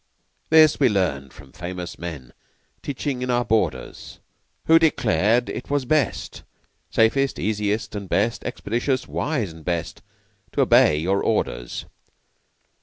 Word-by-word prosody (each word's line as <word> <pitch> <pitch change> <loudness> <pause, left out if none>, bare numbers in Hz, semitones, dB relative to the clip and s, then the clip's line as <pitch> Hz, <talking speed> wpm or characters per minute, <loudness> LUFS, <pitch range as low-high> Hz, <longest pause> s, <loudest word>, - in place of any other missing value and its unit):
This 155 -1 +6
we 135 -3 +4
learned 75 - -1
from 65 - -15
famous 90 0 -7
men 75 -8 -7 0.5
Teaching 140 -2 -3
in 125 - -3
our 120 0 +1
borders. 110 0 -2 0.5
Who 165 0 +6
declare'd 120 - +2
it - - -6
was 145 -2 0
best, 145 -3 -1 0.5
Safest, 135 +5 +2
easiest 105 0 -1
and 100 -3 -6
best 110 +4 0
Expeditious, 120 +2 -2
wise 120 - -2
and 80 -1 -13
best 85 -1 -3 0.5
To - - +1
obey 75 - +5
your 95 +6 0
orders. - - -2
110 Hz, 125 wpm, -23 LUFS, 90-130 Hz, 0.5 s, This